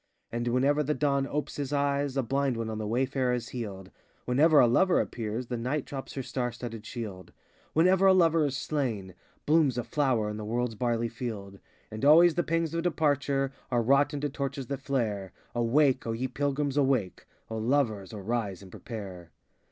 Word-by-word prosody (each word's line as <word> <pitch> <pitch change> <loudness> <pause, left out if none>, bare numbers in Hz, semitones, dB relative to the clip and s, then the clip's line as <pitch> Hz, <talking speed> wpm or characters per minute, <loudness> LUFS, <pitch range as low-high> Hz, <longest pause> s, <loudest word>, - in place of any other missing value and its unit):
And 120 +1 -2
whenever 135 +5 +2
the 150 +1 0
Dawn 140 -2 +1
opes 150 +1 -3
his 140 -2 -3
eyes, 140 -1 0
A 135 - +2
blind 135 0 0
one 115 -1 -3
on 110 - -4
the 110 - -3
wayfare 130 +2 0
is 120 -1 -5
healed; 100 -6 -6 0.3
Whenever 145 +5 +5
a - - +7
Lover 170 +11 +4
appears, 115 +1 -3
The 120 0 -4
Night 130 +5 -2
drops 135 -2 -7
her 135 - -3
star 125 -1 -2
studded 115 -2 -7
shield; 105 -6 -7 0.4
Whenever 185 +4 +4
a 190 - +7
Lover 165 -3 +4
is 135 -1 -3
slain, 120 -12 -2 0.3
Blooms 150 -5 +3
a 120 - -1
flower 120 -3 +1
in 105 0 -4
the 110 - -5
world's 120 +2 -1
barley 120 +1 0
field. 110 -5 -6 0.3
And 110 0 -6
always 165 +4 +7
the 175 - +1
pangs 165 -1 -1
of 165 - 0
departure 145 -5 +1 0.2
Are 120 -2 +1
wrought 140 +4 +4
into 145 -1 -2
torches 140 -1 -4
that 140 -1 -3
flare. 110 -9 -2 0.2
Awake, 130 +3 +2
O 115 - -1
ye 125 +3 -2
Pilgrims, 140 +1 -1
awake! 130 -9 0 0.2
O 110 - -3
Lovers, 110 -5 0
arise 105 -2 -3
and 95 - -13
prepare. 95 -8 -8
130 Hz, 185 wpm, -28 LUFS, 115-145 Hz, 0.4 s, a